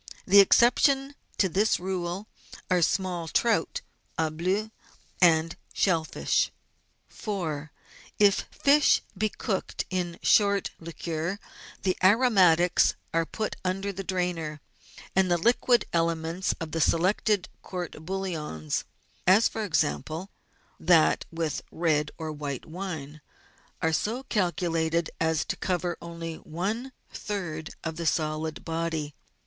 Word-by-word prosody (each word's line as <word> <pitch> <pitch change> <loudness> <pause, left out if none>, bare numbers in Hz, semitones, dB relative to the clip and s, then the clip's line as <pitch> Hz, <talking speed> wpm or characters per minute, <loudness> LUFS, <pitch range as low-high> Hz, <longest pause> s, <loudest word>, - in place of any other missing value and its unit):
The 200 +1 +7
ex 200 - +7
ceptions 270 +3 +3 0.2
to 195 - +3
this 200 +5 +2
rule 185 +2 -3 0.4
are 180 -1 +4
small 180 -1 0
trout 235 - +1 0.2
" - - -39
au 160 -1 +1
bleu 190 +7 -1 0.3
" - - -28
and 165 -1 +4 0.2
shell 165 -5 +2
fish. - - 0 0.6
4. 155 -8 -4 0.5
If 205 -1 +4
fish 285 +1 +4
be 215 +3 0
cooked 200 -2 -3
in 175 -2 -2
short 200 -2 +3
liquor 165 +2 -4 0.5
the 185 -1 +1
aromatics 185 -5 +5 0.2
are 165 0 +1
put 215 -1 -3
under 195 +2 -2
the 195 +1 -5
drainer 175 -5 -2 0.6
and 190 -1 +3
the 175 - +3
liquid 240 +5 +3
elements 165 +1 0
of 165 -1 -5
the 165 - -1
selected 185 +4 +2
court 180 -3 -5
bouillon 160 - -4 0.6
(as, 200 +5 +6
for 220 - -4
example, 155 - -1 0.5
that 165 -1 +4
with 165 -2 -2
red 155 -3 +1
or 160 -1 -4
white 145 -3 -5
wine) 160 -4 -6 0.6
are 160 0 +2
so 230 +10 -1
calculated 170 -6 0
as 160 -1 +1
to - - -2
cover 180 -2 -1
only 165 -1 -6
one 210 +11 -4 0.2
third 175 -6 -5
of 160 -1 -4
the 170 -1 -2
solid 155 0 -1
body. 160 -2 -2
175 Hz, 125 wpm, -27 LUFS, 160-195 Hz, 0.6 s, The